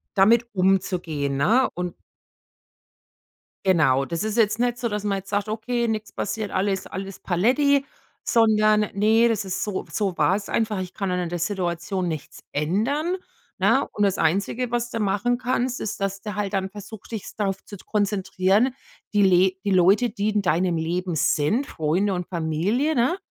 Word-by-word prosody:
damit 225 +5 +5
umzugehen, 180 -7 0
ne? 230 - +3
Und 180 0 -3 1.7
genau, 140 -7 +3
das 170 +7 -3
ist 220 +1 -2
jetzt 220 0 +3
nicht 245 0 +1
so, 240 -1 -1
dass 210 -1 -3
man 200 -1 0
jetzt 190 - -13
sagt, 205 +1 -1
okay, 235 +2 -1
nix 215 -2 -3
passiert, 215 0 -3
alles 190 0 -1
alles 195 0 -7
Paletti, 270 - +2 0.4
sondern 215 -2 +3
ne, 220 +3 +4
das 220 -3 0
ist 190 0 -3
so 205 -3 -3
so 195 -5 -1
war 190 - +3
es 205 - -4
einfach, 215 -3 0
ich 185 -1 -5
kann 195 -3 -3
dann 180 0 0
an 175 -2 -2
der 175 -1 -3
Situation 180 0 -2
nichts 155 -3 -6
ändern, 245 - 0 0.4
ne? - - +3
Und 205 - -1
das 195 -1 +2
einzige, 200 +9 0
was 240 0 -1
du 225 - -3
machen 205 +5 +1
kannst, 250 0 -1
ist, 205 - -4
dass 195 0 -2
du 210 -3 -5
halt 205 -1 -2
dann 190 -1 -1
versuchst, 205 +2 -11
dich 220 -4 -5
darauf 195 -2 -2
zu 205 - -9
konzentrieren, 205 +3 +1 0.4
die 205 -1 +4
le 185 0 +5
die 200 - +1
Leute, 195 +7 +4
die 205 0 -1
in 210 -1 +1
deinem 175 -1 +1
Leben 175 +2 -2
sind, 155 - +1
Freunde 180 +6 0
und 180 -1 -3
Familie, 185 - 0
ne? 255 +10 +2
200 Hz, 175 wpm, -24 LUFS, 180-220 Hz, 1.7 s, damit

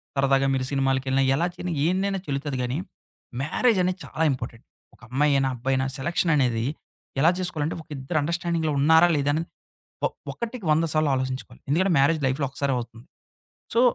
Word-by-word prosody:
సరదాగా 135 0 +3
మీరు 130 -1 -1
సినిమాలకెళ్ళినా 135 0 +1
ఎలా 170 +4 +1
చేసిన, 180 -1 -4
ఏందైనా 195 +2 +1
చెల్లుతది 140 -1 -2
గానీ, 125 +3 -2 0.6
మ్యారేజనేది 185 - +1
చాలా 160 - -2
ఇంపార్టెంట్. 120 -2 -6 0.3
ఒక - - -29
అమ్మాయి 145 +3 +2
అయినా, 135 -1 +2
అబ్బాయి 130 +3 -1
అయినా 130 0 0
సెలక్షననేది 135 -6 +1 0.6
ఎలా 165 +4 +6
జేసుకోవాలంటే, 165 -4 -2
ఒక - - -37
ఇద్దరు 135 +5 -1
అండర్‌స్టా‌డింగ్‌లో 170 -1 -1
ఉన్నారా 160 +4 +6
లేదా 145 0 +1
అన్నది, 165 +2 -2 0.6
ఒ - - +5 0.3
ఒకటికి 235 -3 -6
వంద 165 +2 +2
సార్లు 155 -2 +2
ఆలోచించుకోవాలి. 130 -1 -4
ఎందుకంటే, 180 +5 +2
మ్యారేజ్ 155 +4 +3
లైఫ్‌లో 135 +2 0
ఒసారి 140 -1 0
అవుతుంది. 120 +1 -8 0.7
సో 230 - +4
145 Hz, 155 wpm, -25 LUFS, 135-170 Hz, 0.7 s, ఎలా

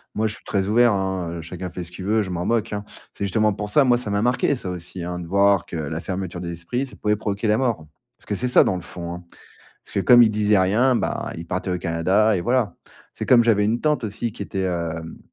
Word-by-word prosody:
Moi 110 - 0
je 110 - -5
suis - - -16
très 100 -1 -1
ouvert, 120 +1 +4
hein, 95 -3 -2
heu, - - -6
chacun 90 +2 -6
fait 90 0 -6
ce 85 - -12
qu'il 95 +1 -8
veut, 110 +1 +2
je 95 - -6
m'en 90 0 -2
moque, 115 -1 0
hein. 105 0 -4 0.3
C'est 100 - -3
justement 105 +2 +2
pour 105 +1 -5
ça 145 +7 +5
moi 125 -2 +3
ça 110 - -6
m'a 100 0 0
marqué, 125 +3 +2
ça 95 - -6
aussi, 90 0 -6
hein, 90 0 -4
de 85 - -7
voir 100 0 +3
que - - -7
la 80 0 -3
fermeture 90 -2 -4
des 85 - -4
esprits, 120 +11 -3
ça - - -12
pouvait 105 0 0
provoquer 105 +1 -2
la 105 - +3
mort. 115 -12 -1 0.3
Parce - - -18
que - - -3
c'est 125 +5 -1
ça 125 - +6
dans - - 0
le 90 - -6
fond, 85 0 -7
hein. 90 0 -8 0.6
Parce - - -14
que, - - +1
comme 120 +4 +7
il 110 - +4
disait 105 -1 +3
rien, 115 +8 +3
bah - - -2
il 85 0 -8
partait 90 +1 -2
au 90 - 0
Canada 95 +6 +2
et 90 - -1
voilà. 120 -1 0 0.4
C'est - - -5
comme, 120 -2 +6
j'avais 105 -3 +3
une 115 +3 +1
tante 150 -5 +1
aussi 110 +2 -3
qui - - -10
était, 95 0 -4
hem, 85 -2 -3
100 Hz, 270 wpm, -22 LUFS, 90-110 Hz, 0.6 s, comme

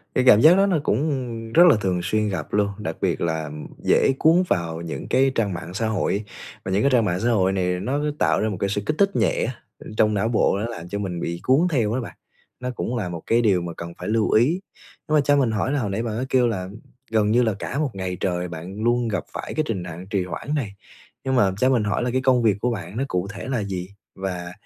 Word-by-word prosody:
Cái 130 - +3
cảm 105 - +8
giác 160 +4 +8
đó 195 - +5
nó 180 -6 +2
cũng 145 +8 +1 0.4
rất 175 - +8
là 140 - +6
thường 90 -2 0
xuyên 105 +3 0
gặp 85 -6 -5
luôn, 100 -1 +2
đặc 105 - -4
biệt - - 0
là 80 -3 -1 0.3
dễ - - +4
cuốn 165 +3 +5
vào 85 -2 -1
những 85 - -6
cái 135 0 +3
trang 105 -5 0
mạng 85 0 -7
xã 110 +2 -1
hội, 105 0 0 0.4
và 95 - -3
những 100 +2 +2
cái 140 - +3
trang 120 -4 +4
mạng 90 -1 0
xã 120 +3 +1
hội 95 -4 +3
này 90 -1 0
nó 130 +9 -1 0.2
tạo - - +2
ra 110 - +1
một 100 - -4
cái 100 - 0
sự 105 +1 -1
kích 155 - 0
thích 200 -1 +3
nhẹ - - +1
á, 125 - -2 0.3
ơ, - - -11
trong 105 -1 +4
não 105 +2 +1
bộ, 110 -3 +2
nó 110 - -2
làm 90 -7 -8
cho 100 - -3
mình 90 -4 -3
bị 85 +1 -3
cuốn 140 +8 +4
theo 115 -6 +1
đó 130 - -1
bạn, - - -8 0.4
nó 125 0 -3
cũng 125 0 -3
là 95 -6 -2
một 85 -2 -6
cái 115 +1 +3
điều 95 -6 +3
mà 85 -1 -5
cần 85 0 -7
phải - - -5
lưu 110 -1 +1
ý. 140 - +3 0.5
Nhưng 155 - +1
mà - - +5
cho 145 +1 +3
mình 125 -5 +2
hỏi 110 +5 -1
là 145 - +1
hồi 105 -5 -2
nãy 105 +4 -2
bạn 110 -1 -3
có 130 - -2
kêu 125 -2 +3
là 95 -5 -2 0.4
gần 105 -1 +2
như 120 +2 +4
là 110 -3 +1
cả 140 - -3
một 150 -3 0
ngày 95 -2 -4
trời 90 -1 -1
bạn 90 +6 -7
luôn 120 0 +2
gặp 100 -6 -2
phải - - -5
cái 155 - +1
trình 95 -6 -2
nặng 90 +2 -8
trì 100 -4 0
hoãn 145 +10 -5
này, 105 -9 -3 0.5
nhưng 130 -1 0
mà 100 -6 +4
cho 130 +4 +3
mình 120 -5 +2
hỏi 105 +3 0
là 125 - -1
cái 130 +1 0
công 130 -2 +3
việc 105 -3 +3
của 125 +1 +1
bạn 95 0 -6
nó 135 - 0
cụ 90 +1 -2
thể 105 - -7
là 125 -6 -1
gì? 95 -2 -4 0.3
Và, 90 -2 -4
105 Hz, 275 wpm, -23 LUFS, 95-125 Hz, 0.5 s, cảm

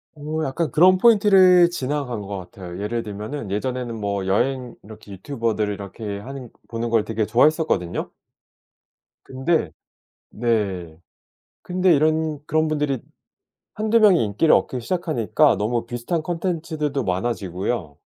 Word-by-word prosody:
어 155 +1 -4
약간 155 +5 -1
그런 185 +3 +5
포인트를 190 -5 +6
지나간 135 -6 -3
것 100 0 -6
같아요. 90 -1 -9
예를 110 +3 -2
들면은 105 +4 -6
예전에는 120 +2 -3
뭐 100 -2 -2
여행 125 +5 0
이렇게 105 -1 -13
유튜버들 110 0 -2
이렇게 100 +1 -6
하는 130 +2 -9 0.2
보는 115 0 -4
걸 115 -2 +3
되게 110 0 -2
좋아했었거든요. 120 - +1 1.1
근데 130 - -1 0.6
네 100 -8 -2 0.6
근데 180 -1 +2
이런 155 0 +1
그런 155 0 +1
분들이 150 -3 -1 0.8
1-2 220 +2 +2
명이 200 -6 +6
인기를 105 +10 +2
얻기 125 - 0
시작하니까 155 - +1
너무 115 +3 -1
비슷한 120 +8 -3
컨텐츠들도 160 -5 -2
많아지고요. 95 -4 -2
125 Hz, 300 characters per minute, -22 LUFS, 105-155 Hz, 1.1 s, 포인트를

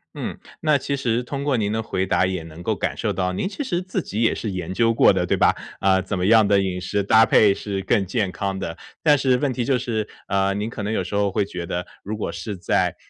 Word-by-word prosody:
嗯， - - -5 0.2
那 155 -2 +3
其 140 +1 -2
实 125 -2 0
通 140 +2 -4
过 140 -4 +1
您 105 -1 0
的 110 0 -1
回 95 -3 -2
答 90 - +2
也 90 -3 -3
能 80 +1 -11
够 110 +5 -1
感 95 - -2
受 110 - -1
到 90 -1 -1
您 190 - -2
其 290 - -4
实 180 -9 -1
自 185 +1 -3
己 110 -4 -4
也 115 - +3
是 110 -3 -4
研 95 0 -4
究 115 +2 +3
过 - - +6
的 90 -2 0
对 - - +1
吧？ - - +3 0.3
呃， 95 -1 +4
怎 100 - -3
么 90 - 0
样 110 -1 +6
的 100 -1 +4
饮 95 -2 -2
食 100 +3 -1
搭 110 +3 +6
配 105 -2 +5
是 100 -1 -4
更 95 0 +1
健 100 -1 -1
康 95 +1 -3
的。 85 -3 -5 0.2
但 150 -2 +5
是 130 -2 +2
问 140 0 0
题 125 -1 -2
就 130 0 +2
是， 110 -4 -2 0.2
呃， 100 0 +1
您 105 +3 -2
可 110 - -6
能 105 +2 -2
有 95 - 0
时 95 - -5
候 100 -1 +1
会 105 - +1
觉 90 -3 -6
得， 90 +1 -4 0.2
如 105 +3 -4
果 105 - -3
是 105 -3 -5
在， 90 - 0
105 Hz, 290 characters per minute, -22 LUFS, 95-120 Hz, 0.3 s, 过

